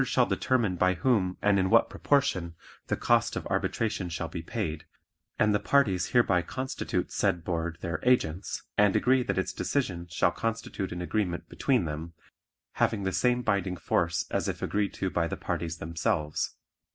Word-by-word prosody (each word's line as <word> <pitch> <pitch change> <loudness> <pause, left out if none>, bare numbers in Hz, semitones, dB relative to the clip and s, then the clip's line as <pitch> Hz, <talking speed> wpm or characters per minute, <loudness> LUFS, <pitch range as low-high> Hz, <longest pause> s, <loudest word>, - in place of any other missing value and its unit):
The - - +2
Board - - -6
shall - - +5
determine 120 -8 +1
by 90 +1 +3
whom 95 -1 +1
and 100 -1 +4
in 95 0 +1
what - - +5
proportion 90 - 0 0.3
the - - 0
cost - - +2
of - - -4
arbitration 105 -5 -1
shall 85 0 -4
be 85 - -5
paid, 85 -5 -4 0.5
and 105 0 +3
the 105 - +2
parties 100 -11 +2
hereby 100 -7 +3
constitute 130 +10 -3
said 85 -1 0
Board 85 -1 -2
their 85 -2 -2
agents 100 -8 +1 0.2
and 105 -2 +5
agree 130 +1 +4
that 125 - -2
its 95 0 -1
decision 90 -11 -2
shall 85 +1 +2
constitute 115 -1 -3
an 90 0 -4
agreement 90 -2 -2
between 125 -9 +1
them, 80 +2 -5 0.7
having 105 -3 +2
the 95 - 0
same 125 +6 +2
binding 95 -4 0
force 85 -2 0
as - - 0
if - - -3
agreed 105 -1 -1
to 95 - -2
by 85 -1 +1
the - - -4
parties 80 -1 -3
themselves. 80 -2 -1
95 Hz, 175 wpm, -28 LUFS, 85-110 Hz, 0.7 s, shall